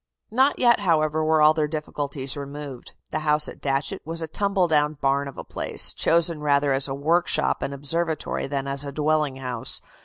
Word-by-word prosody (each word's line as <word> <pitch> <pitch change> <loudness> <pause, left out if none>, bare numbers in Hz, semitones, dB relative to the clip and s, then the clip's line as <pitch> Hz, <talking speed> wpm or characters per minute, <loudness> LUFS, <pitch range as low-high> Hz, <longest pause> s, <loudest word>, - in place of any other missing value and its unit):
Not 265 +5 +3
yet, 240 -2 +4
however, 155 -4 +1
were 155 0 +3
all 155 +1 +7
their 155 -1 0
difficulties 145 -3 -3
removed. 140 -2 -8 0.2
The - - -1
house 150 0 +3
at - - -10
Datchet 135 0 -2
was 165 +1 -2
a - - -4
tumble 195 +1 0
down 150 -1 +2
barn 140 0 0
of 140 - -10
a - - -6
place, - - +1
chosen 165 -2 +2
rather 145 -1 +2
as 135 +1 +2
a 135 - -4
workshop 155 +2 +1
and - - -2
observatory 155 +4 -2
than 140 -1 -3
as 140 0 -1
a 140 - -5
dwelling 150 -1 0
house. 125 -3 -2
150 Hz, 190 wpm, -24 LUFS, 140-160 Hz, 0.2 s, all